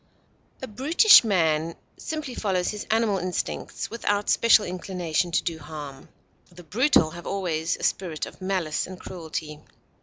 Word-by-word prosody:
A - - -3
brutish 290 - +6
man 165 -6 +1 0.2
simply 310 -5 -5
follows 190 -6 -1
his 210 -1 -7
animal 220 -3 +2
instincts, 180 0 -4
without 205 -3 0
special 230 -2 +5
inclination 180 -2 -2
to 170 - 0
do 165 -2 -3
harm; 145 -4 -9 0.4
the 175 0 -13
brutal 205 - +3
have 170 +1 -9
always 170 -5 -1
a - - -11
spirit 170 -5 -1
of - - -13
malice 185 -5 -1
and 185 -1 -10
cruelty. 160 -4 -6
185 Hz, 145 wpm, -25 LUFS, 160-210 Hz, 0.4 s, brutish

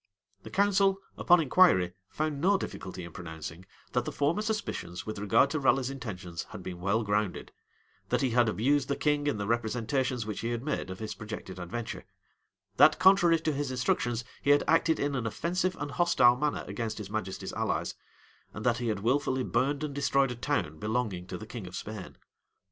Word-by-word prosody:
The - - -10
council, 195 -1 +3 0.2
upon 175 0 +5
inquiry, 130 - +4 0.2
found 150 -2 -2
no 195 +4 +4
difficulty 95 - -6
in 85 - -8
pronouncing, 80 +1 -8 0.2
that - - +1
the - - -4
former 150 +8 +1
suspicions, 215 - -3
with 110 -2 -5
regard 115 +7 +3
to 155 - 0
Raleigh's 135 -1 +2
intentions, 95 -10 -6
had - - -8
been 90 -1 -6
well 100 +5 +1
grounded; 105 -2 -1 0.6
that - - +1
he 130 - +1
had 120 -1 +4
abused 130 +5 +1
the 140 - 0
king 145 -1 +1
in 130 - +1
the 100 - -3
representations 120 +2 0
which 105 -2 -4
he 115 - -2
had 120 0 -3
made 140 -9 -2
of 95 - -6
his 110 +1 -5
projected 105 -4 -7
adventure; 110 +6 -5 0.7
that, 155 - +7
contrary 185 -3 +5
to 155 -2 0
his 145 0 -2
instructions, 120 -2 0 0.2
he 140 - -1
had 145 0 +6
acted 165 0 +3
in 145 0 0
an 125 -4 -1
offensive 180 +9 -1
and 145 0 -4
hostile 130 -9 +4
manner 150 +3 -1
against 115 -2 -4
his 105 -2 -7
majesty's 105 -3 -4
allies; - - -1 0.6
and 110 - -6
that 120 -1 +2
he 120 - -2
had 105 -3 -1
wilfully 130 +2 +1
burned 140 +5 0
and 150 -2 -3
destroyed 140 -1 +2
a - - -4
town 120 - -2
belonging 105 -5 -2
to 90 - -5
the 110 - -8
king 110 -4 -7
of 90 - -8
Spain. 105 -2 -7
120 Hz, 195 wpm, -29 LUFS, 105-145 Hz, 0.7 s, that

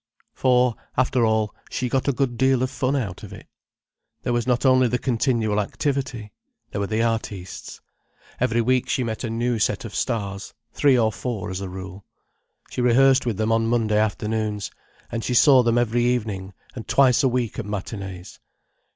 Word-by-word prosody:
For 125 -1 +3 0.2
after 125 -1 +2
all, 110 -1 +1 0.2
she 125 - -2
got 130 +3 -1
a - - +4
good 130 -2 -1
deal 130 0 +2
of 130 - -1
fun 130 +2 -1
out 105 -10 -3
of - - -10
it. - - -11 0.8
There 120 - 0
was 120 +1 -1
not 125 +1 +1
only 130 -1 +5
the 125 +1 0
continual 115 -4 0
activity. 120 -1 -2 0.4
There 100 - -3
were 100 - -1
the 110 +2 0
artistes. 105 -5 -4 0.6
Every 120 -1 +2
week 125 +2 +1
she 130 - +1
met 110 0 -4
a 120 - -2
new 120 +1 -1
set 120 +4 0
of 110 - -8
stars—three 115 +5 -1
or 110 -2 +2
four 110 -5 -4
as 95 +1 -4
a 95 - -5
rule. 95 +1 -8 0.7
She - - -2
rehearsed 130 +2 +4
with 110 -5 -1
them 110 0 0
on 115 0 +2
Monday 110 -2 +2
afternoons, 105 0 -1 0.4
and 115 -1 -3
she 125 - -1
saw 135 +1 +7
them 120 -1 +2
every 120 0 +1
evening, 105 -6 -1 0.2
and 115 - -8
twice 130 -3 +4
a 135 - +3
week 120 -3 -2
at 115 - -4
matinees. 95 -3 -6
115 Hz, 180 wpm, -23 LUFS, 105-125 Hz, 0.8 s, saw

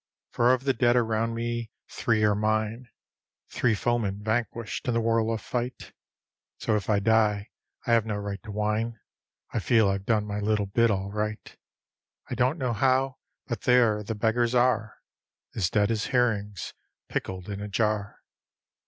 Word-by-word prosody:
For 120 +1 +3
of 130 0 +1
the 135 -1 +2
dead 120 -1 +3
around 115 -1 +1
me 120 0 -3 0.2
three 110 -2 0
are 105 -1 +4
mine, 110 +3 -1 0.6
Three 115 -3 +2
foemen 105 -3 -1
vanquished 115 +1 -2
in 120 - +1
the - - +3
whirl 115 0 +1
of 110 -1 -2
fight; 125 +2 -4 0.6
So 110 - 0
if 105 -1 -2
I 105 - +4
die 105 -1 +2 0.3
I - - 0
have 115 -2 +3
no 105 - -1
right 100 -1 -4
to 110 - -9
whine, 105 +2 -1 0.5
I - - +1
feel 110 -4 +3
I've 100 0 -2
done 110 -2 +2
my 105 0 -3
little 105 0 +1
bit 115 +4 +2
all 100 -1 -1
right. 105 +1 -4 0.8
I - - 0
don't 130 +6 +1
know 130 -5 -1
how 130 +3 +1 0.3
but 120 -5 -4
there 120 -4 +4
the 110 +2 -4
beggars 115 +3 +1
are, 120 -3 +2 0.6
As 95 -5 0
dead 105 +1 +2
as 110 -1 -1
herrings 105 -6 0 0.3
pickled 95 -1 -4
in 100 -1 -5
a 105 - -4
jar. 105 -1 -1
110 Hz, 170 wpm, -27 LUFS, 105-120 Hz, 0.8 s, are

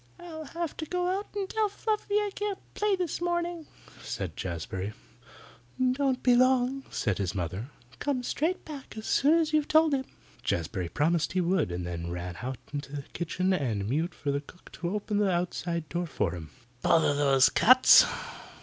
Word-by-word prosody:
"I'll 320 -3 -8
have 335 +2 -4
to 315 - -4
go 360 +1 0
out 410 - -8
and 395 -2 -1
tell 430 +1 0
Fluffy 420 0 -2
I 415 -1 +2
can't 410 -2 -2 0.2
play 420 -1 +1
this 355 -3 -3
morning," 345 -2 -1 0.3
said 110 -7 -5
Jazbury. 95 +3 -4 1.0
"Don't 260 -1 0
be 250 -2 +5
long," 255 +1 +3
said 105 -4 -1
his 95 -2 -2
mother. 95 +5 -3 0.3
"Come 275 -4 -1
straight 325 +8 -1
back 280 -7 -9
as 220 - -6
soon 295 +4 +4
as 320 -2 0
you 310 - +6
have 295 - -5
told 315 -1 +4
him." 265 -1 0 0.4
Jazbury 85 +1 -2
promised 160 - +1
he 185 - +2
would, 180 - +1
and 90 0 -3
then 85 -1 -4
he - - -4
ran 90 0 -5
out 130 +1 -4 0.2
into 145 -1 -5
the 140 - -4
kitchen 185 +2 0
and 115 - -1
mewed 160 +9 -1
for 145 - -2
the 140 0 -1
cook 175 +5 -16
to 170 - -4
open 205 +1 -1
the 205 -2 +3
outside 175 -2 -2
door 175 +2 -2
for 150 - -1
him. 80 -3 -7 0.3
"Bother 160 -3 +4
those 140 -2 +5
cats!" 255 +2 +8
185 Hz, 185 wpm, -28 LUFS, -, 1.0 s, cats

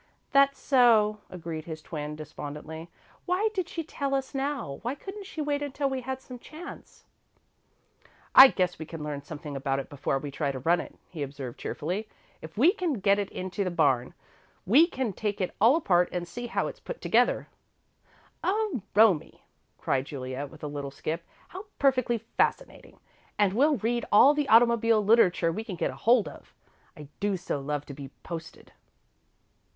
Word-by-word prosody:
"That's 275 0 +4
so," 225 -5 +4
agreed 165 -3 -6
his 160 -2 -6
twin, 150 -1 -6
despondently. 155 +2 -8 0.4
"Why 375 +5 +2
did 370 -4 -2
she 330 - -4
tell 280 -3 -2
us 270 -1 -3
now? 270 - -3
Why 245 +4 -3
couldn't 390 +6 -9
she 315 - -5
wait 290 -1 -1
until 280 -1 -2
we 265 -1 -2
had 265 +1 -4
some 250 -1 -10
chance?" 320 +8 -11 1.3
"I 265 - +12
guess 180 -7 -1
we 160 - -5
can 165 -2 -7
learn 145 -1 -4
something 145 0 -8
about 135 0 -1
it 135 - -5
before 135 -1 -1
we 145 +1 -6
try 140 0 -1
to 135 - -6
run 165 +7 +2
it," - - -11 0.2
he 165 -5 -7
observed, 135 -3 -6
cheerfully. 185 +8 -4 0.3
"If 160 +3 -11
we 300 +10 +6
can 365 -7 -1
get 200 -3 +2
it 200 - -2
into 185 +2 -3
the 185 - -1
barn, 140 -8 +1 0.5
we 280 - +6
can 260 - -3
take 205 +1 -3
it 185 - -2
all 235 +6 +7
apart 180 - +2
and 175 -1 -3
see 240 +7 -6
how 235 - -1
it's - - -6
put - - -7
together." - - +2 1.0
"Oh, 410 - 0
Romie!" 210 -7 +3 0.3
cried 135 0 0
Juliet, 135 0 -5
with 155 +1 -15
a - - -2
little 145 -1 -5
skip. 160 +4 -4 0.3
"How 380 +3 -8
perfectly 255 -3 +2
fascinating! 225 +1 -2 0.4
And 205 -2 +3
we'll 285 +6 +3
read 235 +2 -1
all 265 +8 +7
the 295 -1 -1
automobile 230 -2 +5
literature 185 -6 +4
we 215 +6 -4
can 205 -5 -6
get - - -1
hold 235 -2 +3
of. - - -12 0.4
I 150 -1 -10
do 205 -1 0
so 175 -5 -3
love 145 +1 -3
to 140 - -8
be 140 0 -8 0.2
posted!" 165 -1 -8
205 Hz, 175 wpm, -28 LUFS, -, 1.3 s, I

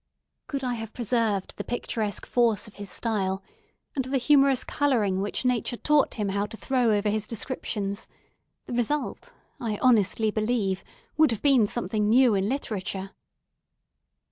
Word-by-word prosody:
Could 275 -2 -3
I 250 -1 0
have 225 -2 -6
preserved 225 -4 0
the - - -3
picturesque 220 -3 -3
force 235 -3 +1
of 215 - -15
his 205 -1 -7
style, 195 -2 -1 0.5
and 265 -3 -1
the 270 +1 0
humourous 275 0 +4
colouring 220 -10 +1
which 205 +5 -2
nature 245 -1 0
taught 300 +2 +2
him 210 -3 -1
how 200 +1 0
to 225 - -10
throw 250 -3 +1
over 205 +1 -1
his 215 +1 0
descriptions, 210 -3 -3 0.6
the - - -6
result, 245 +5 -1 0.3
I 220 -3 -2
honestly 220 -3 +3
believe, 215 -3 0 0.3
would 310 -1 +6
have 225 -3 -3
been 265 -7 +5
something 215 -2 -1
new 245 0 +5
in 195 +1 +1
literature. 195 -7 -3
225 Hz, 150 wpm, -26 LUFS, 205-250 Hz, 0.6 s, would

